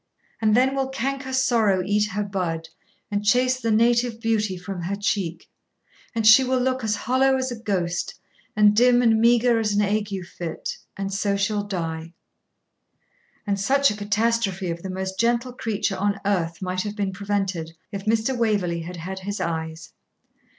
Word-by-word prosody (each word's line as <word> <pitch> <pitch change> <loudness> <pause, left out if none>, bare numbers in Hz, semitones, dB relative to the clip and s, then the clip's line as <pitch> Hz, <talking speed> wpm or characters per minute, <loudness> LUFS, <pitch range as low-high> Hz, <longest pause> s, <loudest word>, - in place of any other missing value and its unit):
And 215 -1 +3
then 265 +2 +3
will 270 -1 -1
canker 265 +1 -3
sorrow 230 -8 +2
eat 210 +1 +2
her 210 0 -2
bud, 170 -5 -3 0.4
And 205 0 -1
chase 255 +4 +3
the 230 -2 -2
native 235 +1 +2
beauty 215 -4 0
from 180 0 -6
her 185 +4 -2
cheek; 195 -5 -2 0.7
And 225 -1 0
she 220 +5 +8
will 260 0 +1
look 255 0 0
as 215 -1 +1
hollow 265 +4 +2
as 260 -1 -2
a 240 - -6
ghost, 180 -6 -2 0.4
And 210 0 +5
dim 245 +2 +5
and 225 -2 +4
meagre 235 0 +4
as 215 -2 0
an 205 - +2
ague 205 -2 -1
fit, 170 -1 -5 0.2
And 195 0 -3
so 200 0 0
she'll 205 +1 0
die. 165 -3 -4 1.3
And 200 -1 -1
such 275 +6 +3
a - - -4
catastrophe 205 -3 0
of 170 0 -5
the 190 - -6
most 190 0 -4
gentle 235 +2 +1
creature 215 -4 -2
on 200 +1 0
earth 175 -3 -1
might 185 0 -1
have 210 +1 -4
been 200 -2 -1
prevented 195 -4 -2 0.2
if 200 -1 -6
Mr. 220 +2 +1
Edward 250 - -3
Waverley 190 -7 +1
had 175 +2 -7
had 190 +3 -6
his 200 +2 -5
eyes! 160 -1 -4
205 Hz, 175 wpm, -24 LUFS, 190-230 Hz, 1.3 s, she